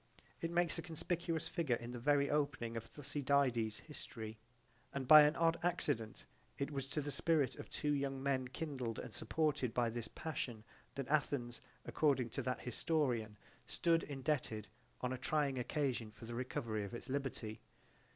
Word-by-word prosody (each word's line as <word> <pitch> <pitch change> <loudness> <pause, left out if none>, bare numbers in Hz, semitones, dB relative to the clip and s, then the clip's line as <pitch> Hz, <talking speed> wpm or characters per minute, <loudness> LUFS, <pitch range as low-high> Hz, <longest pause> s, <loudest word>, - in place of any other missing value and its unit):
It 165 - 0
makes 170 -1 +2
a - - -1
conspicuous 165 0 -1
figure 155 -9 +1
in 120 +1 -6
the 120 - -5
very 140 +2 +4
opening 140 -6 0
of 115 0 -3
Thucydides's 140 -6 +1
history, 110 -7 -7 0.6
and 135 -2 -2
by 155 +2 +12
an 150 +2 +5
odd 165 0 +3
accident 115 - 0 0.3
it 140 +2 -2
was 135 -2 -3
to 150 +2 -1
the 145 0 -3
spirit 145 -2 +2
of - - -8
two 150 - 0
young 135 -2 0
men 130 -2 +1
kindled 130 -5 -3
and 120 - -6
supported 145 -1 0
by 120 -2 +2
this 115 0 -3
passion 120 -8 -4 0.3
that 135 -2 -3
Athens 135 -5 0 0.2
according 135 -6 +2
to - - -2
that 125 0 -2
historian 125 -5 0 0.3
stood 165 -1 +3
indebted 135 -6 -2 0.3
on 125 0 0
a 130 - -4
trying 140 -2 +1
occasion 125 -3 0
for 110 - -11
the 120 - -6
recovery 115 -3 -2
of 100 +3 -5
its - - -6
liberty. 130 -5 -3
135 Hz, 165 wpm, -38 LUFS, 120-150 Hz, 0.6 s, by